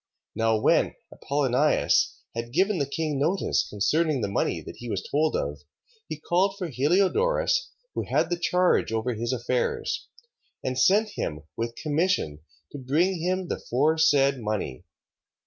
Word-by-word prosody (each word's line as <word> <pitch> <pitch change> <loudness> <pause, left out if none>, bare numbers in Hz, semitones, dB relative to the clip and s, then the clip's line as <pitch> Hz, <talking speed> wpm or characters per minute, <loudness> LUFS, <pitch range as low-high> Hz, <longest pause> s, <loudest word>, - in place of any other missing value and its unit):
3:7. - - -11
Now 115 -1 +2
when - - +2 0.2
Apollonius 140 +1 +1 0.2
had 115 0 -4
given 190 +3 +2
the 140 - 0
king 150 -1 -2
notice 170 +7 +1
concerning 150 +7 +1
the 105 - 0
money 100 - -1
that - - -10
he 120 - -8
was 95 - -2
told 155 +2 +1
of, 70 +1 -2 0.5
he 155 - -5
called 185 +5 +1
for 180 -4 -4
Heliodorus, 195 - +2 0.2
who - - -2
had - - 0
the 175 - 0
charge 180 -7 +2
over 115 +2 -1
his 115 +2 -2
affairs, 125 0 -1 0.6
and 130 - -2
sent 210 - +4
him 75 - -4
with 115 0 -3
commission 155 - 0 0.3
to 145 - -7
bring 160 +7 +1
him 185 +1 -1
the - - -3
foresaid 140 0 +2
money. 105 - -3
145 Hz, 150 wpm, -26 LUFS, 120-175 Hz, 0.6 s, sent